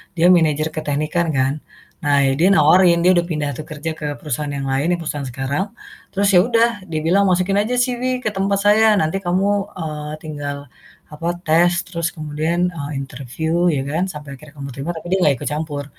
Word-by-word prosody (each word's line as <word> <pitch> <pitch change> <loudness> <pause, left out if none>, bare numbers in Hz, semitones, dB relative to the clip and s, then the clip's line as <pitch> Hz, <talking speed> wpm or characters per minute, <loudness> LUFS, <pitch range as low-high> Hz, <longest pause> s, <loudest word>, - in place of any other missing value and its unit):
dia 170 0 +4
manager 155 -3 +3
keteknikan 155 +2 -1
kan, 130 +1 +2 0.5
nah 145 -1 +3
ya 135 - +3
dia 175 - +5
nawarin, 170 +3 +5
dia 180 - +6
udah 175 -2 +2
pindah 150 -4 -2
tuh 155 - -7
kerja 155 +1 -5
ke 150 - -5
perusahaan 150 0 -3
yang 140 - -3
lain 135 +4 0
yang - - -8
perusahaan 145 -3 -4
sekarang, 135 +8 -2 0.5
terus 200 +1 +2
ya 180 - +6
udah 230 -1 +4 0.2
dia 160 -2 -2
bilang 195 +5 +3
"Masukin 185 +2 +2
aja 220 +5 0
CV 250 0 0
ke - - +1
tempat 195 0 0
saya 215 +1 +5
nanti 195 0 0
kamu, 185 +1 0 0.3
eee, 150 -3 -5
tinggal, 145 -2 -5 0.5
apa, 155 +3 -5 0.2
tes 175 +3 +3
terus 170 -2 -2
kemudian, 160 +3 -1
eee, 150 -4 -6
interview 140 +6 -2
ya 135 - -1
kan 155 +6 -1
sampai 150 -5 -8
akhirnya 150 +2 -15
kamu 140 -1 -7
keterima." 140 +6 -4
Tapi 160 - -8
dia 190 - +3
nggak 140 - +4
ikut - - -2
campur, 150 -2 -4
160 Hz, 195 wpm, -20 LUFS, 145-185 Hz, 0.5 s, dia